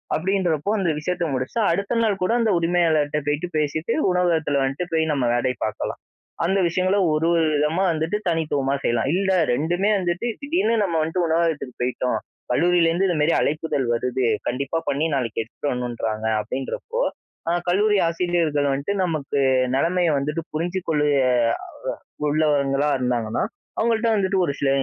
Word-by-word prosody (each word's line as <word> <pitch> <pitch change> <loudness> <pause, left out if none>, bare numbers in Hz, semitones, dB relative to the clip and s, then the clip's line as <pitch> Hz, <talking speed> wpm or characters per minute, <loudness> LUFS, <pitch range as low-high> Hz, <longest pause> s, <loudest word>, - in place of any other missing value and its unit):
அப்பிடின்றப்போ 180 -1 0
அந்த 185 -3 +1
விஷயத்த 175 +2 -2
முடிச்சு, 130 - -3
அடுத்த 200 +6 -1
நாள் 205 -3 +1
கூட 185 - +1
அந்த 230 -2 +2
உரிமையாளர்ட்ட 165 -4 +2
போயிட்டு 150 +4 0
பேசிட்டு, 155 +7 -1 0.2
உணவகத்தில 165 -5 +1
வந்துட்டு 135 +7 -2
போய் 160 -1 +1
நம்ம 135 -4 0
வேலைய 125 +1 0
பார்க்கலாம். 110 - -4 0.5
அந்த 190 +3 +2
விஷயங்கள 185 +3 +1 0.2
ஒரு, 155 +2 +1
ஒரு 165 -1 +3
விதமா 150 +5 +1
வந்துட்டு 160 +6 -1
தனித்துவமா 145 -5 0
செய்யலாம். 120 +2 +1
இல்ல, 190 0 +1 0.2
2ம்மே 175 +9 0
வந்துட்டு 175 +5 -1
திடீர்னு 285 -6 +1
நம்ம 175 -4 -1
வந்துட்டு 165 +3 0
உணவகத்துக்கு 160 -5 -1
போயிட்டோம். 125 -2 -1 0.3
கல்லூரியிலேருந்து 175 +4 +3
இந்தமாரி 165 -2 +2
அழைப்பிதழ் 150 -3 -1
வருது, 125 +2 -1 0.2
கண்டிப்பா 140 +5 -1
பண்ணி, 145 +3 0
நாளைக்கு 115 -4 -1
எடுத்துட்டு 140 +5 -4
வரணுன்றாங்க 115 -3 -3
அப்பிடின்றப்போ, 135 - -4 0.5
ஆ - - +2 0.2
கல்லூரி 205 +3 +3
ஆசிரியர்கள் 165 -4 0
வந்துட்டு 140 +9 -1
நமக்கு 155 -5 -1 0.4
நிலைமைய 175 +4 +2
வந்துட்டு 150 +4 -2
புரிஞ்சு 175 +4 -1
கொள்ளு 150 -2 +2 0.2
அ - - +3 1.0
உள்ளவங்களாக 145 -2 +2
இருந்தாங்கன்னா, 120 -3 -1 0.3
அவுங்கள்ட்ட 230 0 +1
வந்துட்டு 195 -1 +1
ஒரு 140 - -1
சில 140 - +1
160 Hz, 145 wpm, -23 LUFS, 140-180 Hz, 1.0 s, ஒரு